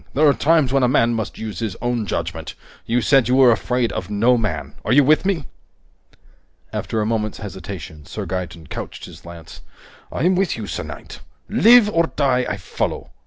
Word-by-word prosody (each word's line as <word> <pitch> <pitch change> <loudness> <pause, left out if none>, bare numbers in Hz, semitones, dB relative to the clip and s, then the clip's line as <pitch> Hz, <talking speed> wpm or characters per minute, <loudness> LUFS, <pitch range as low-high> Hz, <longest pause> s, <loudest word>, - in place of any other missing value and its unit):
There 150 +3 +5
are 140 - +6
times 150 -4 +2
when 135 - +3
a 125 - +4
man 120 -2 +3
must 110 -2 -4
use 110 -5 -6
his 110 -5 -3
own 120 -3 -2
judgment! - - -4 0.3
You 120 +2 +1
said 130 0 +4
you 125 - +2
were 130 -2 +6
afraid 120 +2 0
of 90 - -5
no 115 +5 +3
man. 110 -3 -3
Are - - -2
you 140 +3 +6
with 155 +7 +3
me?" 170 -8 -1 1.3
After 110 - -2
a - - 0
moment's 110 -1 -1
hesitation, 95 -7 -8
Sir 105 +3 -5
Gaeton 90 -2 -5
couched - - -7
his - - -13
lance. 85 -1 -11 0.5
"I'm 180 +3 +1
with 185 -5 0
you, 110 - -5
sir - - -4
knight! - - -9 0.3
Live 235 0 +6
or 170 -5 +1
die, 130 -3 +1
I 100 - -2
follow! 95 - -4
120 Hz, 190 wpm, -21 LUFS, 105-140 Hz, 1.3 s, are